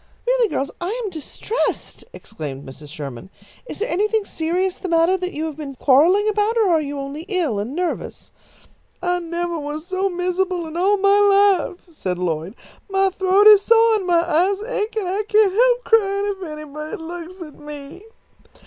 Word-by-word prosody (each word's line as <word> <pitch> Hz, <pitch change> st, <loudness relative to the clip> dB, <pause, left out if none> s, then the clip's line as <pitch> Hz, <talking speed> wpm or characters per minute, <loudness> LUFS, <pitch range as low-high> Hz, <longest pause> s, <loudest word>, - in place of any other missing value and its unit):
"Really, -, -, +2 dB
girls, 280 Hz, -8 st, -3 dB
I 400 Hz, +8 st, -3 dB
am 405 Hz, -, -4 dB
distressed!" 355 Hz, +8 st, -3 dB
exclaimed 145 Hz, -, -8 dB
Mrs. 145 Hz, +3 st, -11 dB
Sherman. 140 Hz, 0 st, -8 dB, 0.4 s
"Is -, -, -7 dB
there 435 Hz, -, -2 dB
anything 425 Hz, 0 st, 0 dB
serious 360 Hz, +3 st, -2 dB
the 375 Hz, -, -5 dB
matter 335 Hz, +2 st, +3 dB
that 365 Hz, -1 st, -3 dB
you 310 Hz, +2 st, -3 dB
have 310 Hz, -2 st, -6 dB
been 285 Hz, -3 st, -7 dB
quarrelling 330 Hz, +12 st, +4 dB
about, 430 Hz, +2 st, +1 dB
or 435 Hz, -4 st, +3 dB
are 325 Hz, -2 st, +3 dB
you 290 Hz, -1 st, -5 dB
only 275 Hz, +2 st, -5 dB
ill 340 Hz, -, 0 dB
and 230 Hz, +8 st, -4 dB
nervous?" 355 Hz, 0 st, -4 dB, 0.7 s
"I 355 Hz, 0 st, +1 dB
nevah 340 Hz, 0 st, -3 dB
was 300 Hz, +2 st, -5 dB
so 375 Hz, +1 st, -1 dB
mizzible 360 Hz, 0 st, -1 dB
in 320 Hz, 0 st, -8 dB
all 390 Hz, +4 st, +2 dB
my 400 Hz, +1 st, +4 dB, 0.6 s
life," -, -, -33 dB
said 190 Hz, -, -4 dB
Lloyd. 175 Hz, +2 st, -3 dB, 0.3 s
"My 390 Hz, 0 st, +2 dB
throat 380 Hz, +2 st, +3 dB
is 420 Hz, -2 st, +9 dB
soah 455 Hz, +1 st, +4 dB
and 380 Hz, -3 st, -5 dB
my 340 Hz, -1 st, +2 dB
eyes 365 Hz, +4 st, +2 dB
ache, 440 Hz, -2 st, -3 dB
and 405 Hz, -4 st, -1 dB
I 385 Hz, +3 st, -1 dB
can't 425 Hz, -3 st, +4 dB
help -, -, +3 dB
cryin' 400 Hz, -3 st, +2 dB
if 380 Hz, -, -10 dB
anybody 305 Hz, 0 st, -7 dB
looks 345 Hz, +2 st, -8 dB
at 305 Hz, -3 st, -13 dB
me." 295 Hz, +4 st, -10 dB
355 Hz, 180 wpm, -21 LUFS, 305-400 Hz, 0.7 s, is